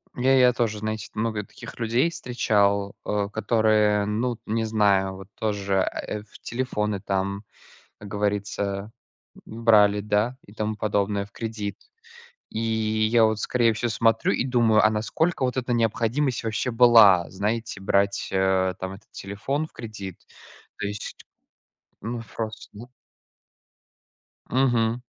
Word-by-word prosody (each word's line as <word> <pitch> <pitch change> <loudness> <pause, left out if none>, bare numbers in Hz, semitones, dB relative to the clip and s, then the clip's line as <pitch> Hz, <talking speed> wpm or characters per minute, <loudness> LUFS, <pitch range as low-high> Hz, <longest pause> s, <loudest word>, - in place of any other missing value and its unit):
Я 130 +2 +3
я 125 -1 +6
тоже 110 -3 -1
знаете 110 0 -4
много 110 -1 -2
таких - - -12
людей 120 +7 +2
встречал, 100 -8 0
э, 100 -1 -1
которые, 110 -2 +2
ну, 115 +4 -1
т 115 - -25
не 115 +1 -1
знаю, 100 -3 +2
вот 95 -1 -11
тоже, 100 -2 -2
э, 105 +2 -2
в 110 - -17
телефоны, 105 -5 -2
там, 100 +1 -2 0.6
как 105 - -10
говорится, 100 0 -2 0.5
б 110 +1 -9
брали, 105 -3 +5
да, 105 +4 0
и 100 - -15
тому 110 0 -3
подобное, 100 -1 0
в 100 - -26
кредит. 110 -3 -5 0.7
И 110 - -4
я 110 0 +2
вот, 110 -1 +1
скорее 120 -2 +2
всего, 120 +2 -2
смотрю 115 0 +2
и - - 0
думаю, 120 -4 +3
а 110 - +5
насколько 120 +10 -1
вот 125 0 -1
эта 125 -1 -1
необходимость 115 +3 0
вообще 110 +3 -1
была, 115 -7 +6
знаете, 105 +3 -3
брать, 100 0 +1
э, 95 -1 +2
там 95 0 -5
этот 100 +3 -17
телефон 120 +10 -3
в - - -24
кредит? 105 -6 -8 0.6
То - - -2
есть, 105 0 -6 0.9
ну, 115 +2 -4
ф 115 - -13
просто. 110 0 -7 1.6
Мгм. 120 -3 +2
110 Hz, 140 wpm, -25 LUFS, 100-115 Hz, 1.6 s, я